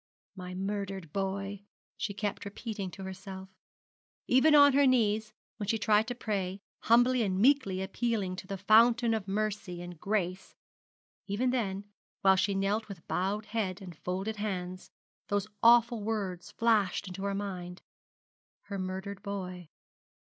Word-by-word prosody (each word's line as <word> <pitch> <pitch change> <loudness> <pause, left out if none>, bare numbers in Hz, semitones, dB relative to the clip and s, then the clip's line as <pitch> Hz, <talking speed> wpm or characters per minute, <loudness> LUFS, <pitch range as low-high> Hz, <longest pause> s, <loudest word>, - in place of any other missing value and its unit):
'My 180 -1 -7
murdered 195 -3 -4
boy,' 195 +1 -2 0.3
she 210 - -3
kept 205 0 -3
repeating 200 -1 -5
to 190 +2 -9
herself. 190 0 -8 0.8
Even 300 +5 +5
on 285 -1 +8
her 280 0 +5
knees, 220 -4 +2 0.3
when 205 -2 -4
she 225 - +2
tried 215 +1 +3
to 245 - -3
pray, 195 -5 -2 0.2
humbly 245 +2 +4
and 190 -4 0
meekly 220 -5 +3
appealing 200 -2 -1
to 190 - -8
the 195 - -4
Fountain 230 +4 +5
of 215 -3 -2
mercy 200 -3 -2
and 175 -2 -8
grace 190 -2 -2 0.7
even 230 +6 +1
then, 200 -6 -1 0.4
while 190 0 +6
she 190 +1 +1
knelt 200 +3 0
with 195 -6 -10
bowed 200 +3 -1
head 210 -4 -2
and 180 -4 -9
folded 190 +7 -3
hands, 185 -3 -4 0.4
those 205 -1 0 0.2
awful 235 -1 +6
words 200 -5 -3
flashed 215 -5 +1
into 185 +1 -7
her 200 0 -1
mind. 180 -3 -5 0.8
Her 200 -1 -6
murdered 190 +1 -4
boy. 185 -4 -6
200 Hz, 145 wpm, -30 LUFS, 190-220 Hz, 0.8 s, on